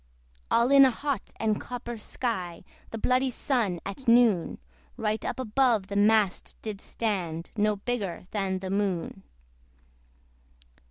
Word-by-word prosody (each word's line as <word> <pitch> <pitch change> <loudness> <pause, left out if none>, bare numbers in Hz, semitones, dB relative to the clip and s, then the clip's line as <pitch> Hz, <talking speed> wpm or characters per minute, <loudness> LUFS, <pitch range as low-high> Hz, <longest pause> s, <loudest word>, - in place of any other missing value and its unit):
All 235 +3 +3
in 275 0 +9
a 265 - +7
hot 280 +2 -3
and 215 -2 0
copper 245 -1 -6
sky, 185 -8 -3 0.3
The 225 - -5
bloody 255 +4 +2
Sun, 235 - -1
at 220 +7 -7
noon, 230 -7 +4 0.4
Right 215 0 -1
up - - -3
above 235 -4 +2
the 200 - -4
mast 205 -1 +2
did 215 -2 -5
stand, 175 -7 -3
No 210 0 +2
bigger 200 -3 -3
than 195 -3 -1
the 185 0 -5
Moon. 195 -2 -1
215 Hz, 130 wpm, -27 LUFS, 195-245 Hz, 0.4 s, in